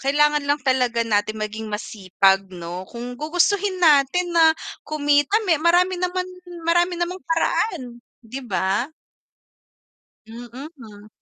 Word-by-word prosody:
kailangan 295 +2 +2
lang 285 - +3
talaga 250 -3 +1
natin 215 -1 0
maging 215 +1 -5
masipag 195 -2 +1
no. 180 0 -8
Kung 240 +1 -7
gugustuhin 370 +5 +1
natin 340 +1 +3
na 325 -1 +5 0.3
kumita 290 +4 +2
me 330 -6 +2
marami 355 +2 +2
naman 365 0 -1 0.4
marami 345 +2 +2
namang 350 +2 -3
paraan 325 - -1 0.2
'di 250 +5 -7
ba? 200 +8 -1 1.3
Mm, 230 +2 -10 0.3
mhm. 210 -3 -13
285 Hz, 120 wpm, -22 LUFS, 220-345 Hz, 1.3 s, na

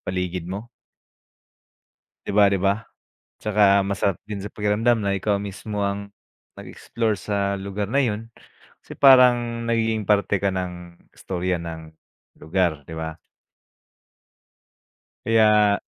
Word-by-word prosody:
paligid 90 -1 -4
mo. 100 +5 -6 1.6
'Di - - -3
ba, 105 - +7
'di 100 - +1
ba, 100 +1 +3 0.6
tsaka 100 -2 +3
masarap 100 -1 0
din 105 -1 -6
sa 100 - -5
pakiramdam 110 +3 +1
na 100 - 0
ikaw 100 +1 0
mismo 100 +1 -4
ang 100 0 -3 0.5
nag-explore 110 -3 -3
sa 100 -1 -2
lugar 100 +1 -4
na 140 - +2
'yon, 115 -2 -2 0.5
kasi - - -12
parang 120 -3 +5
nagiging 110 -1 0
parte 100 -1 +1
ka 100 - +2
ng 90 -2 -6 0.2
istorya 90 -2 -3
ng 80 -1 -8 0.5
lugar, 80 -3 0
'di 80 - -10
ba? 80 0 -4 2.1
Kaya 105 -3 +4
100 Hz, 120 wpm, -23 LUFS, 95-110 Hz, 2.1 s, ba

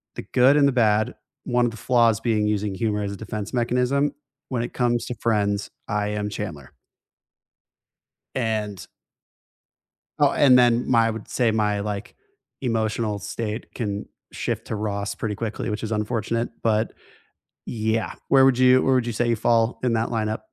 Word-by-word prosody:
the - - -6
good 130 +4 +5
and 140 -1 +5
the - - +3
bad 110 -3 +2 0.3
one 120 0 +2
of 120 - 0
the 115 - -10
flaws 115 -3 +3
being 110 -3 +1
using 105 -2 -1
humor 105 -1 -1
as 100 - -3
a - - -5
defense 105 +1 -6
mechanism, 125 +4 +1 0.4
when 125 -3 -1
it 120 - -6
comes 120 -1 +1
to 125 - -5
Friends, 105 -3 0 0.2
I 105 0 -1
am 105 0 -2
Chandler. 85 -10 -6 1.6
And 110 -5 -2 1.3
Oh, - - +4
and 130 -3 +6
then 120 0 +3
my 115 -2 +5
I - - +1
would 110 -1 -7
say 120 -3 +1
my, 105 -2 +1
like, 105 0 -5 0.5
emotional 110 -3 -1
state 110 +1 -5
can 100 -4 -3 0.2
shift - - -3
to 110 - -2
Ross 100 -1 -3
pretty 105 -2 -3
quickly, 115 +1 -4
which 105 - -3
is 110 0 -3
unfortunate, 115 +2 -1
but 110 -1 +1 0.7
yeah. 110 -1 -1 0.2
Where 135 -1 +6
would 130 -2 +4
you 130 0 +6
where 135 -1 +3
would 125 -2 +2
you 120 - -2
say 120 +2 0
you 115 - +2
fall 115 +1 +2
in 120 -2 +2
that 110 0 +1
lineup? 110 -1 -1
115 Hz, 170 wpm, -24 LUFS, 105-120 Hz, 1.6 s, and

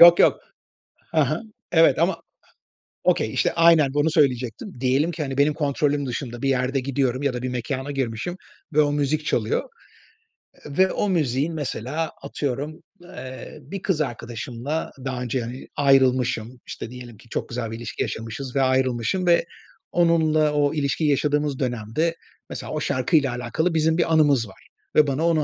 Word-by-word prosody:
Yok 170 0 +10
yok. - - +4 0.7
Ha - - +3
ha. - - -2 0.3
Evet 165 -1 +5
ama, 175 +4 +1 0.8
okay - - +2
işte, - - +1
aynen 165 -5 +5
bunu 145 +2 +2
söyleyecektim. 130 - 0
Diyelim 135 +6 +2
ki, 165 -2 -3
hani, 135 -2 -4
benim 145 +1 +4
kontrolüm 145 -1 0
dışında 120 -2 -5
bir 135 - +1
yerde 130 +1 +1
gidiyorum 130 0 -1
ya 140 -2 +1
da 125 - -4
bir 130 - -2
mekâna 130 +3 -3
girmişim 135 +5 -3 0.4
ve 155 - +5
o 145 -1 +2
müzik 145 +1 0
çalıyor. - - 0 1.0
Ve 185 +6 +2
o 205 - 0
müziğin, 150 -2 +1
mesela 150 +1 -3
atıyorum, 140 +2 -4 0.2
eee, 130 -7 -9
bir 195 +7 -7
kız 185 -6 0
arkadaşımla 120 +3 -4
daha 130 -2 -3
önce, 125 +1 -1
hani, 120 +3 -7
ayrılmışım. 130 -4 +2
İşte, - - -6
diyelim 125 -3 -10
ki 115 - -19
çok - - -3
güzel 115 -2 -4
bir 115 - -5
ilişki 115 -1 -5
yaşamışız 115 +4 -4
ve 135 - +3
ayrılmışım. 130 - +1
Ve 170 -1 +4 0.5
onunla 160 -3 +3
o 145 -1 +2
ilişkiyi 150 +1 0
yaşadığımız 145 0 +1
dönemde 125 +6 -1 0.3
mesela - - -6
o 155 - -1
şarkıyla 140 +1 +2
alakalı 125 +8 -1
bizim 160 0 +2
bir 165 -2 +1
anımız 145 -7 +4
var. 95 - -17 0.3
Ve 150 -1 +6
bana 145 +4 +1
onu 160 -3 +3
140 Hz, 165 wpm, -23 LUFS, 125-155 Hz, 1.0 s, Yok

